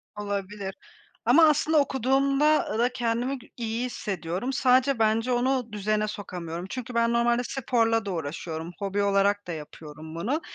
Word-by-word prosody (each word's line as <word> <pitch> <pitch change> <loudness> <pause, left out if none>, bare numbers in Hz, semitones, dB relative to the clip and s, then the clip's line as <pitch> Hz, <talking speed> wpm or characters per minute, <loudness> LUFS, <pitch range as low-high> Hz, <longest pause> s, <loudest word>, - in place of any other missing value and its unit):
Olabilir 200 -1 -4 0.5
ama 280 +8 +7
aslında 305 +1 +3
okuduğumda 275 -1 +2
da 240 - +3
kendimi 245 +3 -1 0.2
iyi 230 +1 -2
hissediyorum, 190 +1 -3
sadece 255 0 +3
bence 225 +3 +2
onu 245 -2 0
düzene 215 +1 0
sokamıyorum 180 -4 -6
çünkü 250 0 -5
ben 235 0 +2
normalde 235 +1 +2
sporla 230 -4 +1
da - - -2
uğraşıyorum, 160 +1 -5
hobi 200 0 -1
olarak 200 0 +2
da 175 - -4
yapıyorum 155 0 -9
bunu 240 - -1
225 Hz, 135 wpm, -26 LUFS, 195-250 Hz, 0.5 s, ama